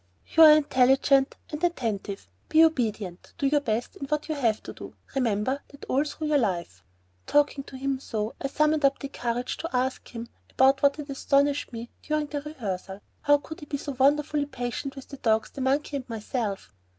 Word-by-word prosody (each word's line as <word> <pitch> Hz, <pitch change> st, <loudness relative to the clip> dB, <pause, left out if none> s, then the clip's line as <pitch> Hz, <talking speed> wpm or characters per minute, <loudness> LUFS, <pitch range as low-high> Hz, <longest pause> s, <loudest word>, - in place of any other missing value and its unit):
"You 325 Hz, -, +7 dB
are 310 Hz, -1 st, +11 dB
intelligent 270 Hz, -1 st, +4 dB, 0.2 s
and 300 Hz, +2 st, -5 dB
attentive. 220 Hz, -, -2 dB, 0.2 s
Be 320 Hz, +1 st, +6 dB
obedient, 215 Hz, -, -2 dB
do 280 Hz, -, -1 dB
your 290 Hz, +1 st, +3 dB
best 235 Hz, -3 st, -2 dB
in 275 Hz, -, -6 dB
what 300 Hz, +1 st, -1 dB
you 315 Hz, -, -1 dB
have 235 Hz, -7 st, 0 dB
to -, -, -8 dB
do. -, -, -10 dB, 0.2 s
Remember 255 Hz, +1 st, 0 dB
that 280 Hz, -, -13 dB
all 275 Hz, +3 st, +2 dB
through 305 Hz, 0 st, -2 dB
life." 170 Hz, -, -2 dB, 0.4 s
Talking 290 Hz, -1 st, +2 dB
to 265 Hz, -, -9 dB
him 270 Hz, 0 st, -1 dB
so, 220 Hz, -4 st, -3 dB
I -, -, 0 dB
summoned 305 Hz, +2 st, +1 dB
up 275 Hz, 0 st, +4 dB, 0.2 s
courage 240 Hz, +1 st, -2 dB
to 330 Hz, -, -4 dB
ask 260 Hz, +1 st, -1 dB
him 235 Hz, -1 st, -7 dB, 0.2 s
about 270 Hz, +1 st, +4 dB
what 280 Hz, 0 st, +4 dB
had 295 Hz, -, -6 dB
so 285 Hz, -, -8 dB
astonished 280 Hz, +1 st, +1 dB
me 235 Hz, 0 st, -7 dB
during 305 Hz, 0 st, -1 dB
the 290 Hz, 0 st, -4 dB
rehearsal: 200 Hz, -10 st, -5 dB, 0.2 s
how 290 Hz, 0 st, +5 dB
could 315 Hz, +2 st, -10 dB
he 295 Hz, -, -10 dB
be 285 Hz, -, -2 dB
so 285 Hz, +1 st, -5 dB
wonderfully 290 Hz, +1 st, +3 dB
patient 265 Hz, +1 st, -4 dB
with 270 Hz, -, -10 dB
the 275 Hz, -, -8 dB
dogs, 220 Hz, -4 st, +1 dB
the 275 Hz, -, -7 dB
monkey, 280 Hz, +2 st, 0 dB
and 255 Hz, -2 st, -8 dB
myself? 215 Hz, -, -4 dB
270 Hz, 195 wpm, -27 LUFS, 235-290 Hz, 0.4 s, are